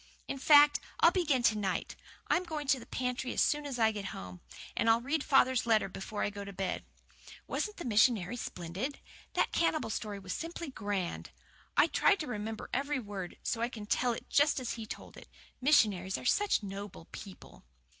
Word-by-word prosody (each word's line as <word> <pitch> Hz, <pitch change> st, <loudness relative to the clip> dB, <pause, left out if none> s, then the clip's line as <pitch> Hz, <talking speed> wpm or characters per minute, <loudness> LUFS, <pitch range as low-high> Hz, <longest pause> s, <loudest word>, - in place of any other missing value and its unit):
"In 275 Hz, -, -4 dB
fact, 290 Hz, +1 st, +7 dB, 0.2 s
I'll 335 Hz, -, +7 dB
begin 300 Hz, -9 st, +1 dB
to 220 Hz, -, +4 dB
night. 195 Hz, -3 st, -2 dB, 0.3 s
I'm 365 Hz, -, +2 dB
going 310 Hz, -4 st, -4 dB
to 270 Hz, -, +4 dB
the 230 Hz, -, -12 dB
pantry 250 Hz, 0 st, -2 dB
as -, -, +3 dB
soon 295 Hz, 0 st, 0 dB
as 270 Hz, -3 st, -4 dB
I 220 Hz, -1 st, +4 dB
get 205 Hz, -2 st, -5 dB
home, 90 Hz, -1 st, -9 dB, 0.3 s
and 230 Hz, -, +2 dB
I'll 225 Hz, +1 st, +5 dB
read 280 Hz, +5 st, -1 dB
father's 260 Hz, -4 st, +3 dB
letter 220 Hz, -3 st, +3 dB
before 195 Hz, +2 st, -5 dB
I -, -, 0 dB
go 200 Hz, 0 st, -6 dB
to 200 Hz, -, -7 dB
bed. 190 Hz, -1 st, -3 dB, 0.6 s
Wasn't 420 Hz, 0 st, -3 dB
the 345 Hz, -, -6 dB
missionary 220 Hz, -2 st, +3 dB
splendid? 195 Hz, -, -5 dB, 0.3 s
That -, -, +1 dB
cannibal 310 Hz, -7 st, +1 dB
story 210 Hz, -2 st, -3 dB
was 190 Hz, -2 st, -5 dB
simply 335 Hz, -2 st, -5 dB
grand. 200 Hz, -6 st, -3 dB, 0.5 s
I -, -, +7 dB
tried 400 Hz, -, +3 dB
to -, -, -3 dB
remember 220 Hz, -3 st, -5 dB
every 285 Hz, +2 st, 0 dB
word, 200 Hz, -6 st, -6 dB
so 230 Hz, -, -1 dB
that 230 Hz, -, +2 dB
I -, -, -9 dB
can 215 Hz, -4 st, -8 dB
tell 240 Hz, +3 st, +1 dB
it -, -, -8 dB
just 290 Hz, 0 st, +3 dB
as 255 Hz, -, -3 dB
he 225 Hz, -2 st, -7 dB
told -, -, -8 dB
it. -, -, -12 dB, 0.3 s
Missionaries 205 Hz, -9 st, +3 dB
are -, -, -9 dB
such 405 Hz, -, +2 dB
noble 195 Hz, -3 st, -7 dB
people." 195 Hz, -3 st, -11 dB
230 Hz, 195 wpm, -32 LUFS, 205-285 Hz, 0.6 s, fact